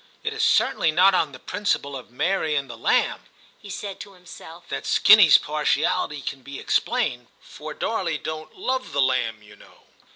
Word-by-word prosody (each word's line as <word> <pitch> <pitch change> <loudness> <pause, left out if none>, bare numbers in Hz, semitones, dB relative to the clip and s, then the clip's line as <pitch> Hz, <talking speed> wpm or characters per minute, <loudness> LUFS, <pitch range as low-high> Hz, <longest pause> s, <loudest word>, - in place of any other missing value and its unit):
' - - -34
It 445 0 -2
is 440 - -4
cer - - +3
tainly 160 - +1
not 185 +5 +5
on 160 -5 +1
the 130 - -11
principle 185 -8 -2
of 130 - -9
Mary 160 +4 -1
and 140 -1 -1
the 120 - -9
lamb,' 115 - 0 0.3
he 205 - -13
said 200 0 -6
to 200 - -10
himself, 175 -2 -13
'that - - -5
Skinny 210 -5 +7
's - - +9
partiality 150 -1 -1
can 135 - -6
be 140 +2 -9
explained, 150 - -1
for 150 +1 -10
Darley 180 -8 -2
don't 155 +1 -7
'Move 260 - -3
the 140 - +1
lamb, 115 -4 -1
you 105 - -16
know." - - -20
155 Hz, 195 wpm, -23 LUFS, 140-195 Hz, 0.3 s, s